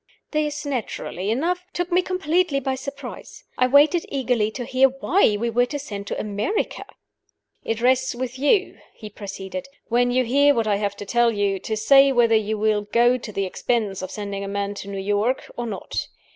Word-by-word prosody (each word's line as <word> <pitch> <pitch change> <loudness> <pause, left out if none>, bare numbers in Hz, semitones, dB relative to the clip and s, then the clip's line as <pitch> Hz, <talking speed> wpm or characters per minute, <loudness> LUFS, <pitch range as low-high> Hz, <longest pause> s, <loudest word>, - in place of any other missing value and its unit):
This, 300 -1 -1
naturally 225 -7 -3
enough, 340 +10 0
took 355 +1 -2
me 360 +1 +4
completely 360 -4 0
by 265 0 -2
surprise. 275 -1 -8
I 255 - +3
waited 295 +6 +5
eagerly 250 -6 0
to 245 +2 -6
hear 265 +1 +4
why 270 - +2
we 235 +2 -1
were 245 +2 +2
to 290 - -4
send 205 -8 -7
to - - -3
America. 215 - -2 0.8
"It 225 0 -2
rests 260 +1 +2
with 255 +1 -5
you," 375 - +2 0.2
he 215 -1 -10
proceeded, 200 +6 -7 0.2
"when 245 +1 +3
you 255 +1 +2
hear 285 +4 +4
what 230 - +1
I 205 -2 +1
have 200 -1 -2
to 205 - -8
tell 240 +3 +3
you, 200 -2 0
to 220 +3 -3
say 275 +5 +6
whether 240 -3 +3
you 220 0 0
will 215 0 +1
go 240 +4 +2
to 225 - -8
the 195 -1 -1
expense 205 0 -1
of 185 - -5
sending 200 -1 -5
a - - -4
man 200 0 -2
to - - -10
New 200 - -5
York, 205 +6 -1
or 240 0 -4
not. 200 -4 -4
240 Hz, 195 wpm, -23 LUFS, 210-275 Hz, 0.8 s, say